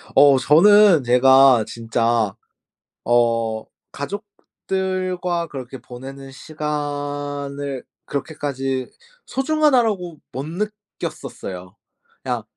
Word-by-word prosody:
어 140 -1 +7
저는 185 +3 +6
제가 130 -1 +6
진짜 115 -2 0 0.7
어 115 -2 +1 0.3
가족들과 185 0 -3
그렇게 135 -2 -8
보내는 135 +3 -10
시간을 145 -2 -4 0.2
그렇게까지 135 -3 -3 0.3
'소중하다.'라고 250 - +1
못 135 +3 -5
느꼈었어요. 170 - -6 0.5
그냥 - - -2
145 Hz, 190 characters per minute, -21 LUFS, 130-180 Hz, 0.7 s, 어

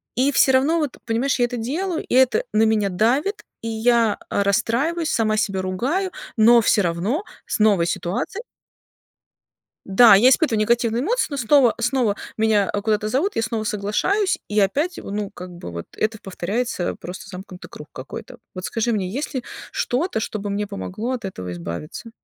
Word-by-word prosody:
И 265 +3 +2
всё 265 - +5
равно 300 +6 +3
вот, 295 -5 -3
понимаешь, 245 +3 0
я 245 - +4
это 245 - -4
делаю, 320 +10 -2
и - - -5
это 260 - +4
на 220 - +4
меня 215 -2 +2
давит, 255 - +1 0.2
и 230 - -4
я, 225 -1 +2
а, 200 - +1
расстраиваюсь, 255 - 0
сама 215 -2 +1
себя 195 -3 0
ругаю, 265 - -1 0.3
но 235 +2 +7
всё 210 -1 +3
равно 185 - -1 0.2
с - - -2
новой 200 -6 +4
ситуацией 195 - -3 1.4
Да, 200 +3 +7
я 225 +6 +6
испытываю 255 -5 +3
негативные 235 +2 +1
эмоции, 475 +10 +1
но 285 - -3
снова 245 0 +4
снова 245 -3 +1 0.2
меня, 215 -3 +2
а, 205 - -2
куда-то 215 -1 0
зовут, 290 - 0
я 225 - +1
снова 225 -1 -2
соглашаюсь 215 - 0
и 210 0 +1
опять, 295 - 0
во - - -8
ну, 205 -1 -3
как 180 -2 -9
бы 175 - -9
вот 85 0 -6
это 220 0 -1
повторяется, 195 +1 -2
просто 180 +1 -9
замкнутый 185 0 -10
круг 150 - -11
какой-то. 130 - -9 0.2
Вот 185 - -6
скажи 235 +1 -1
мне, 195 -4 -1
есть 280 +7 -4
ли 255 - -2 0.3
что-то, 255 -1 -1
чтобы 205 -2 -4
мне 205 +1 -2
помогло 210 +4 -4
от 245 -5 -4
этого 90 - -5
избавиться? 85 - -7
225 Hz, 180 wpm, -22 LUFS, 200-260 Hz, 1.4 s, но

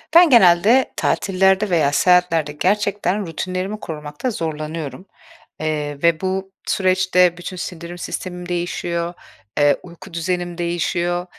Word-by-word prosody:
Ben 345 -2 +8
genelde 220 +3 +5
tatillerde 190 +1 +2
veya 155 -5 +2
seyahatlerde 165 -1 +3
gerçekten 200 +3 0
rutinlerimi 185 +5 -4
korumakta 150 - -5
zorlanıyorum. 155 - -5 0.5
Eee, 150 -2 -2
ve 170 -1 +3
bu 190 0 -2 0.2
süreçte 185 -2 +3
bütün 180 +1 -7
sindirim 175 0 -6
sistemim 180 0 -6
değişiyor, 175 0 -2 0.5
eee, 145 0 +5
uyku 175 +1 -13
düzenim 175 0 -2
değişiyor. 175 +1 -1
175 Hz, 110 wpm, -20 LUFS, 165-190 Hz, 0.5 s, Ben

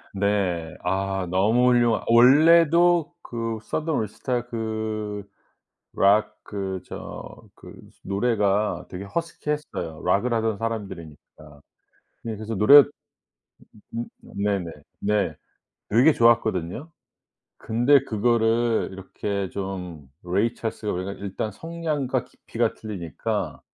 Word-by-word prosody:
네. 95 -5 0
아 95 +1 -1
너무 110 +7 +3
훌륭한 120 -2 +3
원래도 165 +7 +5
그 115 -1 -3
Southern 160 +1 -3
All - - 0
Star 120 +3 -3
그 110 -3 -4 0.7
락 105 +2 +4
그 95 -2 -4
저 - - -9
그 - - -13 0.3
노래가 100 -3 0
되게 95 +2 -7
허스키했어요. 150 - -4
락을 100 +7 +2
하던 110 -2 0
사람들이니까. 85 -9 -7 0.6
네 115 -2 -4
그래서 110 +2 -5
노래 140 +9 +9 1.1
음 115 +1 -2 0.2
네네. 100 -4 -2 0.3
네. 105 0 0 0.5
되게 125 +9 +5
좋았거든요? 115 - +1 0.7
근데 120 +5 +3
그거를 115 0 +1
이렇게 95 +1 -4
좀 90 -7 -6 0.2
Ray 100 +7 0
Charles가 110 -2 -4
우리가 95 +2 -3
일단 100 +2 -5
성량과 150 -3 -2
깊이가 115 -1 -3
틀리니까 90 -9 -4
110 Hz, 265 characters per minute, -24 LUFS, 95-120 Hz, 1.1 s, 노래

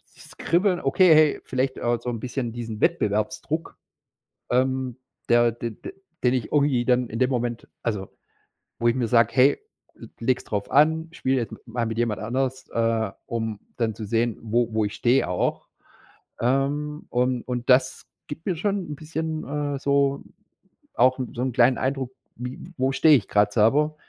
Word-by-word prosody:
dieses - - -15
Kribbeln, 180 +1 +2
okay, 160 +5 +5
hey, 155 -1 +4
vielleicht 130 +1 -2
auch 120 0 0
so 125 - -4
'n 115 -2 -4
bisschen 125 -2 -3
diesen 115 -2 -6
Wettbewerbsdruck, 150 - -1 0.7
ähm, 130 0 0 0.3
der 120 0 +5
d 115 +1 -5
d 110 - -10 0.3
den 125 - +3
ich 125 -4 -2
irgendwie 140 -5 +2
dann 125 -1 +2
in 115 - -6
dem 130 0 +3
Moment 120 -2 -2 0.2
also 105 -5 -2 0.7
wo 120 - +2
ich 115 - +3
mir 125 -3 -1
sage: 115 -1 +4
„Hey, 135 +2 +5 0.6
leg's 125 +2 0
darauf 100 -1 -3
an, 160 +3 +3
spiel 135 -4 0
jetzt 120 -3 -2
m - - -8
mal 115 -1 -3
mit 115 - -4
jemand 115 -4 -1
anders, 130 +3 -2
äh, 115 -2 0 0.2
um 110 -2 -3 0.2
dann 115 -3 0
zu 110 - -7
sehen, 115 +2 0
wo 115 +1 +1
wo 110 -1 +2
ich 105 - -3
stehe 125 +3 +2
auch.“ - - -1 0.7
Ähm, 145 +4 -1
und 125 0 0
und 125 -1 -3
das 130 0 +3 0.2
gibt 145 +2 -8
mir 185 -4 0
schon 195 -2 -2
'n - - -3
bisschen, 160 +1 -4 0.3
äh, - - -3
so 140 0 +1 0.7
auch 130 +1 +4
'n 125 -3 -4
so 120 - -3
'n 130 - 0
kleinen 125 +1 +4
Eindruck, 130 -1 -2 0.3
wie 125 +1 -6 0.2
wo 130 +1 +1
stehe 150 +3 +5
ich 105 - -6
grad 105 0 +2
selber? 145 +9 +3
125 Hz, 175 wpm, -24 LUFS, 115-140 Hz, 0.7 s, okay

